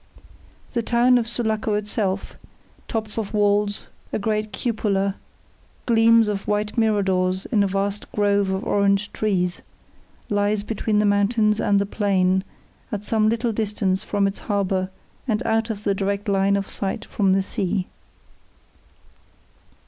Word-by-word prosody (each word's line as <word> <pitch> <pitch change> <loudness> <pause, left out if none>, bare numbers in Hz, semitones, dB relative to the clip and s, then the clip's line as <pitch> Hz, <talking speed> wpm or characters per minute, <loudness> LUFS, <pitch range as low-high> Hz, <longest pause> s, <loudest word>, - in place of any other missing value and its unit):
The 240 - +1
town 245 +2 +4
of 230 - -2
Sulaco 220 -2 0
itself 205 -2 -2 0.5
tops 220 -1 -3
of 215 -1 -4
walls, 205 0 +1 0.2
a - - 0
great 215 0 -1
cupola, 200 -3 0 0.7
gleams 230 -1 +5
of 205 -2 -3
white 210 0 -1
miradors 190 -4 +1
in 215 -4 +3
a 200 - +3
vast 195 +1 -2
grove 205 -1 +2
of 190 +1 -2
orange 200 0 +1
trees 180 -4 0 0.7
lies 205 0 +1
between 215 0 -1
the 210 - +3
mountains 210 +1 +2
and 200 - +3
the 200 - +1
plain, 190 -2 +1 0.5
at 210 -2 -3
some 215 0 +2
little 230 +1 0
distance 205 -3 -1
from 205 -1 0
its 195 0 -2
harbour 190 -2 -1 0.4
and 225 0 0
out 225 0 +1
of 210 -2 -4
the 200 - +1
direct 200 +1 -2
line 195 0 +2
of 195 -1 -1
sight 200 +2 -3
from 195 -3 +1
the 195 0 +2
sea. 190 -1 -2
205 Hz, 140 wpm, -23 LUFS, 195-220 Hz, 0.7 s, gleams